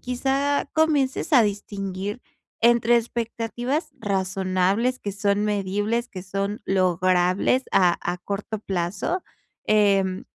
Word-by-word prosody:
quizá, 270 Hz, +3 st, 0 dB
comiences 300 Hz, -2 st, +1 dB
a 245 Hz, -, +7 dB
distinguir 200 Hz, +1 st, -4 dB, 0.4 s
entre 235 Hz, 0 st, +5 dB
expectativas 240 Hz, +6 st, -2 dB
razonables, 195 Hz, +4 st, 0 dB
que 200 Hz, -, -4 dB
son 200 Hz, 0 st, 0 dB
medibles, 210 Hz, +4 st, -1 dB
que 185 Hz, -2 st, -8 dB
son 195 Hz, +2 st, -3 dB
logrables 185 Hz, +5 st, +2 dB
a 180 Hz, -3 st, +4 dB
a 175 Hz, +1 st, -2 dB
corto 200 Hz, +4 st, -5 dB
plazo, 195 Hz, -, -2 dB, 0.4 s
em, 195 Hz, -3 st, +2 dB
205 Hz, 105 wpm, -24 LUFS, 190-240 Hz, 0.4 s, a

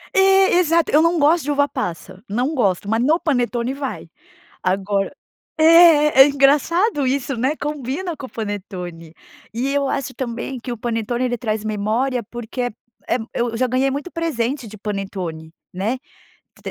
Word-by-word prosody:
É, 385 Hz, -1 st, +5 dB
exato. 335 Hz, -2 st, +2 dB
Eu 300 Hz, -, +5 dB
não 335 Hz, +1 st, +2 dB
gosto 310 Hz, +2 st, +3 dB
de 295 Hz, -, 0 dB
uva 285 Hz, 0 st, +2 dB
passa, 185 Hz, -, -6 dB
não 250 Hz, +8 st, -1 dB
gosto. 200 Hz, -, 0 dB
Mas 225 Hz, +2 st, +1 dB
no 315 Hz, +6 st, +3 dB
panetone 245 Hz, -4 st, 0 dB
vai. 275 Hz, -2 st, -6 dB, 0.5 s
Agora 195 Hz, +4 st, 0 dB, 0.4 s
é 315 Hz, -3 st, +7 dB
é -, -, +4 dB
engraçado 290 Hz, -, +2 dB
isso, 270 Hz, 0 st, -1 dB
né. 265 Hz, +6 st, 0 dB
Combina 295 Hz, +4 st, -4 dB
com 265 Hz, -, -7 dB
o -, -, -17 dB
panetone. 180 Hz, -6 st, -6 dB, 0.4 s
E 260 Hz, +5 st, -1 dB
eu 280 Hz, -1 st, +1 dB
acho 260 Hz, -1 st, -3 dB
também 245 Hz, +1 st, -5 dB
que 245 Hz, +1 st, -6 dB
o 240 Hz, -, -4 dB
panetone 235 Hz, +2 st, -2 dB
ele 245 Hz, -1 st, -1 dB
traz 215 Hz, -2 st, -2 dB
memória, 220 Hz, +5 st, -1 dB
porque 240 Hz, +1 st, -6 dB
eh 245 Hz, -3 st, -2 dB, 0.3 s
eh 240 Hz, -, +1 dB, 0.2 s
eu 235 Hz, -1 st, -1 dB
já 255 Hz, +1 st, +1 dB
ganhei 255 Hz, +2 st, +1 dB
muito 290 Hz, +6 st, -5 dB
presente 275 Hz, -6 st, -2 dB
de 215 Hz, -, -11 dB
panetone, 190 Hz, -6 st, -5 dB, 0.2 s
né. 210 Hz, +8 st, -1 dB, 0.7 s
T -, -, -5 dB
255 Hz, 165 wpm, -20 LUFS, 215-290 Hz, 0.7 s, é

